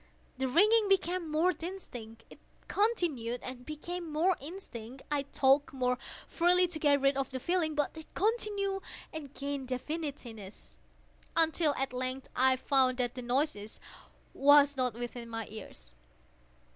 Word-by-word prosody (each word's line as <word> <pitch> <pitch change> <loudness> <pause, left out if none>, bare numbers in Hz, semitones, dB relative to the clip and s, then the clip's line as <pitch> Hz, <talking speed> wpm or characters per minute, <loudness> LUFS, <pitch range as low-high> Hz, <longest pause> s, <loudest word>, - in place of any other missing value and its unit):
The 265 - +1
ringing 420 - +4
became 365 -3 +1
more 325 +4 +3
distinct:—it 245 - -9 0.3
continued 325 - 0
and 255 -1 -7
became 335 +2 -5
more 335 +5 +3
distinct: 270 - -9
I 290 -1 +2
talked 275 +1 +3
more 250 -1 0 0.3
freely 360 +1 +3
to 320 -2 -4
get 290 -2 +4
rid 275 0 +3
of 270 -1 -1
the 260 - -4
feeling: 335 0 0
but 295 +1 0
it 320 -1 -10
continued 405 -2 0 0.3
and 300 -4 -6
gained 280 -1 -4
definiteness—until, 290 - -2
at 270 -1 -2
length, 255 +1 -3
I 260 +1 +5
found 260 -1 +2
that 245 -1 0
the 250 - -6
noise 245 -4 -1 0.5
was 285 0 +6
not 250 -3 0
within 240 0 -6
my 225 -1 -4
ears. 65 - -10
280 Hz, 135 wpm, -31 LUFS, 250-340 Hz, 0.5 s, was